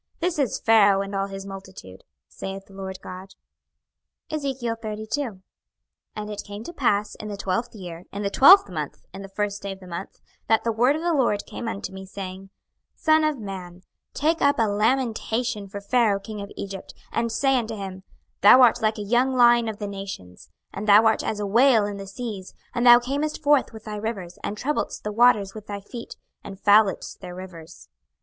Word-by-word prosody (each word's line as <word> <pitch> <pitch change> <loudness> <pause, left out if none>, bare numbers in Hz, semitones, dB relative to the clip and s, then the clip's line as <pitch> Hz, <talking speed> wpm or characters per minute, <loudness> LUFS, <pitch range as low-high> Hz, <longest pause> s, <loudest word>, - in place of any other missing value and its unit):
This 345 -2 -1
is 265 -6 +1
Pharaoh 205 -3 +5
and 200 0 -8
all 195 0 -1
his 195 0 -7
multitude, 190 - -10 0.2
saith 195 0 -7
the 195 - -18
Lord 190 -1 -6
GOD. 185 +1 -9 1.0
26:032:001 230 -5 -3 0.7
And 210 0 -5
it 205 -1 -5
came 205 +1 -8
to 345 - -8
pass 210 -8 +1
in 215 - -8
the 205 -1 -5
twelfth 205 +5 -2
year, 175 -3 -9
in 200 +1 -5
the 200 - -1
twelfth 375 - +8
month, 155 -6 -6
in 190 - -8
the 195 - -9
first 205 +1 -3
day 200 - -4
of 190 - -14
the 185 - -13
month, 175 +1 -7 0.3
that 225 0 +3
the 230 - +1
word 245 +6 +3
of 315 - -4
the 345 -1 +1
LORD 240 -8 +1
came 235 - -6
unto 200 -3 -5
me, 190 0 -9
saying, 190 0 -8 0.5
26:032:002 - - -29
Son 315 -1 +5
of 310 -2 +1
man, 185 -4 -8 0.3
take 320 +3 +1
up 285 0 +3
a 230 - +3
lamentation 225 0 0
for 200 +1 -7
Pharaoh 210 -1 +2
king 210 +1 -7
of 200 - -7
Egypt, 195 -1 -7 0.2
and 230 0 -1
say 270 +3 +2
unto 225 -1 -4
him, 190 -2 -7 0.4
Thou 210 +5 +8
art 240 0 +4
like 215 0 +1
a 210 - -4
young 245 +5 +2
lion 240 -2 +5
of 215 - -6
the 210 - -5
nations, 195 - -8 0.2
and 205 +2 -5
thou 210 +2 +7
art 220 -1 +3
as 215 - -2
a 205 - -2
whale 230 +1 +4
in 205 -1 -4
the 195 0 -8
seas: 200 -2 -7 0.2
and 245 0 +1
thou 240 0 +10
camest 285 +6 -3
forth 290 -2 +3
with 220 -2 -11
thy 210 -1 -6
rivers, 200 -5 -5
and 210 - -4
troubledst 295 +7 -2
the 210 - -3
waters 215 -3 +4
with 215 -1 -10
thy 205 -1 -5
feet, 235 +4 -9 0.3
and 195 -1 -9
fouledst 205 -1 +3
their 180 - -8
rivers. 170 - -11
210 Hz, 200 wpm, -24 LUFS, 195-240 Hz, 1.0 s, thou